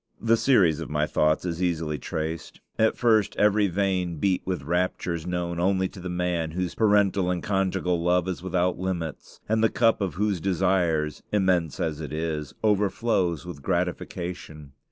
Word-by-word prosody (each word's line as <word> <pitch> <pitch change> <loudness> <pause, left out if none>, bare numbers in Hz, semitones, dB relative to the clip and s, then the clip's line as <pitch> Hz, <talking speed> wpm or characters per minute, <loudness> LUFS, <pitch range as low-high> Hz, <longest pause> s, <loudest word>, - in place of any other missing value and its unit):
The 115 +1 +3
series 100 - +3
of - - -6
my 75 0 +1
thoughts 75 +2 +1
is 85 -1 -3
easily 80 -4 -1
traced. 80 +4 -5 0.2
At 110 0 +3
first 110 -4 +3
every 105 0 +3
vein 90 -2 0
beat 90 +4 +1
with 90 -7 -2
raptures 85 0 -1
known 85 -1 -2
only 95 +1 +2
to - - -12
the 90 0 -6
man 90 -2 -1
whose 90 0 -2
parental 100 -4 +3
and 90 -1 -2
conjugal 95 -3 0
love 90 +1 +2
is 95 -2 -3
without 90 -1 0
limits, 90 -4 -4
and 110 +1 +1
the 115 - +5
cup 115 -2 +2
of 95 -3 -2
whose 100 -2 0
desires, 90 -5 +1
immense 90 -7 +1
as 80 -1 -2
it 75 - -6
is, 75 -2 -3
overflows 100 -5 +1
with 85 -5 -8
gratification. 85 -3 -4
90 Hz, 165 wpm, -26 LUFS, 85-95 Hz, 0.2 s, the